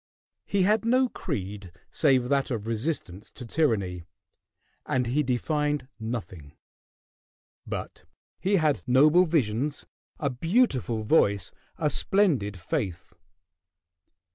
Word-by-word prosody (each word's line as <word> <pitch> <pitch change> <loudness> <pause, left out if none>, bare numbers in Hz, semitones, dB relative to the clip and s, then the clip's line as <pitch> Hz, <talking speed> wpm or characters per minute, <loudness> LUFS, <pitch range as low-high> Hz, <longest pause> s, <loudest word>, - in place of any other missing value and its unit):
He 200 -2 +1
had 215 +4 +3
no 255 +2 +3
creed 100 - -5 0.2
save 130 -5 +3
that 140 -1 +1
of 110 -5 -3
resistance 115 - -3
to 125 - -9
tyranny, 105 - 0 0.8
and 125 -1 0
he 130 +6 +1
defined 145 +2 -1
nothing; 110 -10 -6 1.1
but - - -6 0.3
he 200 +2 +1
had 155 -5 +2
noble 150 +8 +5
visions, 145 -3 -1 0.3
a 140 -2 -1
beautiful 130 - +1
voice, 100 - +2 0.3
a 150 - 0
splendid 140 - +2
faith. 85 0 -4
130 Hz, 105 wpm, -27 LUFS, 105-155 Hz, 1.1 s, noble